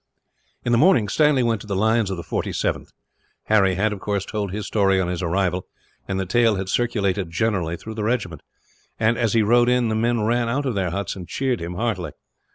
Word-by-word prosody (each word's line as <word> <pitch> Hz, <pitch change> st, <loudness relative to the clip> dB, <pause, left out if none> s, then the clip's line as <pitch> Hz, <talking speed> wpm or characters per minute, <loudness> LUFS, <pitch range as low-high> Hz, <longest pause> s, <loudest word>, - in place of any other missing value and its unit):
In 120 Hz, -, 0 dB
the 115 Hz, -, +4 dB
morning, 155 Hz, -, +4 dB
Stanley 150 Hz, 0 st, +3 dB
went 115 Hz, -3 st, 0 dB
to -, -, -11 dB
the 100 Hz, -, -2 dB
lines 110 Hz, +1 st, +2 dB
of 95 Hz, -, -3 dB
the 85 Hz, -, -6 dB
47th. 85 Hz, -, -2 dB, 0.6 s
Harry 100 Hz, -4 st, +3 dB
had, 105 Hz, +3 st, +1 dB
of 100 Hz, -, -7 dB
course, 100 Hz, 0 st, -2 dB
told 105 Hz, -3 st, -3 dB
his 105 Hz, +1 st, -4 dB
story 95 Hz, -1 st, +2 dB
on 95 Hz, -, 0 dB
his 90 Hz, 0 st, -3 dB
arrival; 90 Hz, +1 st, -1 dB, 0.4 s
and 95 Hz, -1 st, -2 dB
the 95 Hz, -, -1 dB
tale 115 Hz, +3 st, +3 dB
had 95 Hz, 0 st, -4 dB
circulated 100 Hz, -6 st, 0 dB
generally 85 Hz, -2 st, -1 dB
through 110 Hz, -, -8 dB
the 110 Hz, -1 st, -4 dB
regiment 105 Hz, -, -2 dB, 0.6 s
and, 110 Hz, +1 st, +3 dB
as 115 Hz, -3 st, 0 dB
he 115 Hz, -1 st, +4 dB
rode 120 Hz, +3 st, +4 dB
in, 125 Hz, -2 st, +2 dB
the 110 Hz, -, 0 dB
men 115 Hz, +1 st, +1 dB
ran 120 Hz, +1 st, +1 dB
out 135 Hz, +5 st, 0 dB
from 130 Hz, -3 st, -1 dB
their 95 Hz, -3 st, -1 dB
huts 100 Hz, +2 st, -3 dB
and 90 Hz, -3 st, -8 dB
cheered 130 Hz, -3 st, -1 dB
him 85 Hz, +1 st, -5 dB
heartily. 100 Hz, -4 st, -2 dB
105 Hz, 220 wpm, -22 LUFS, 95-115 Hz, 0.6 s, the